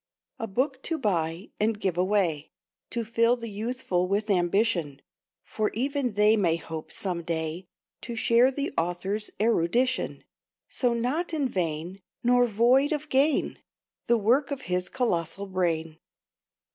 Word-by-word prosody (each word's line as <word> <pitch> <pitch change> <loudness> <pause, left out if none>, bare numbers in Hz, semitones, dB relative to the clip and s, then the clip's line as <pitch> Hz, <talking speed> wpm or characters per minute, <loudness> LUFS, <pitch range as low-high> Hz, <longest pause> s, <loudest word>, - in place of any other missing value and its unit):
A 225 - -3
book 260 +6 -1
to 325 - 0
buy 175 - -1
and 215 0 +1
give 190 -4 -1
away, 180 -5 +1 0.4
To 235 -2 -3
fill 230 +2 +3
the 230 -2 -7
youthful 205 -4 -1
with 205 +3 0
ambition, 175 -5 +1 0.4
For 215 -1 -1
even 270 0 -1
they 210 +2 +5
may 175 -6 +2
hope, 160 -1 -7
some 180 -3 -3
day, 165 +1 -3 0.3
To 235 - -6
share 235 +2 +4
the 280 +1 -3
Author's 190 +5 -2
erudition; 230 +4 +1 0.4
So 245 -2 0
not 295 +9 -1
in 285 -4 +1
vain, 175 -2 -3 0.2
nor 245 0 +4
void 245 +7 +3
of 300 0 -4
gain, 280 +3 +2 0.5
The 235 - +4
work 240 +7 +2
of 280 -2 -4
his 180 -3 -2
colossal 200 -6 -1
brain. 165 -4 -1
210 Hz, 140 wpm, -27 LUFS, 175-245 Hz, 0.5 s, they